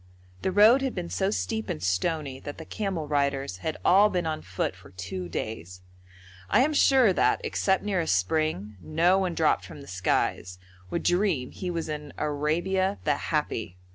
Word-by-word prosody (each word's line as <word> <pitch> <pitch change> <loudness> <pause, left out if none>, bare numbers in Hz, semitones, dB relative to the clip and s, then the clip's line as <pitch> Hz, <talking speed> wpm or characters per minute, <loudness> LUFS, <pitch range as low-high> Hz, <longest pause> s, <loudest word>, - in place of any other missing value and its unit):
The 190 - 0
road 215 +7 +6
had 265 -2 -2
been 175 -2 -4
so 190 0 0
steep 220 +1 -2
and 75 - -4
stony 135 - -1
that 145 - -8
the 160 - -8
camel 190 -7 -3
riders 140 -7 0
had 155 - -4
all 200 +3 +6
been 180 -3 -1
on 155 -1 -2
foot 95 0 -3
for 95 - -16
two 90 -1 -6
days. 90 -1 -5 0.7
I - - +4
am 305 +4 +2
sure 260 -8 +5
that, - - +2
except 190 -1 +1
near 200 -3 0
a 165 - -4
spring, 105 - 0
no 170 - +2
one 180 -3 -1
dropped 160 -2 +2
from 145 - -10
the 140 - -12
skies 90 0 -1 0.3
would 170 - -2
dream 175 -8 +1
he 185 - -5
was 170 -2 -3
in 150 -1 -6
Arabia 175 +7 0
the 150 - +2 0.2
Happy. 115 - -2
155 Hz, 180 wpm, -27 LUFS, -, 0.7 s, road